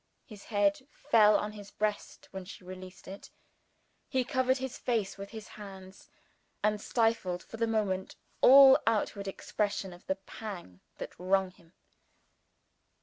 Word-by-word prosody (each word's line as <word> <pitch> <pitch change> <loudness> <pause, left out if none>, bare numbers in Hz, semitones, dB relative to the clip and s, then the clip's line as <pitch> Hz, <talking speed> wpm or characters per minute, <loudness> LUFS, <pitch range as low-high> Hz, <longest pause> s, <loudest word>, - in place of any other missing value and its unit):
His 210 -3 -13
head 205 +4 +1
fell 215 -7 +4
on 210 - -3
his 205 -1 -11
breast 210 0 -3
when 190 -1 -6
she 185 0 -11
released 185 0 -10
it: 195 +2 -9 0.8
he 260 -2 +1
covered 260 0 +1
his 265 -1 -5
face 225 -6 -1
with 200 0 -8
his 220 -1 -9
hands, 195 -2 -11 0.5
and 210 0 +1
stifled, 225 -7 0
for 225 - -10
the 230 0 +1
moment, 200 -4 -1 0.3
all 270 0 +9
outward 205 -2 0
expression 195 -1 -2
of 175 - -16
the 190 - +1
pang 190 - -9 0.2
that - - -7
wrung 190 +1 +1
him. 170 -1 -24
205 Hz, 145 wpm, -30 LUFS, 190-225 Hz, 0.8 s, all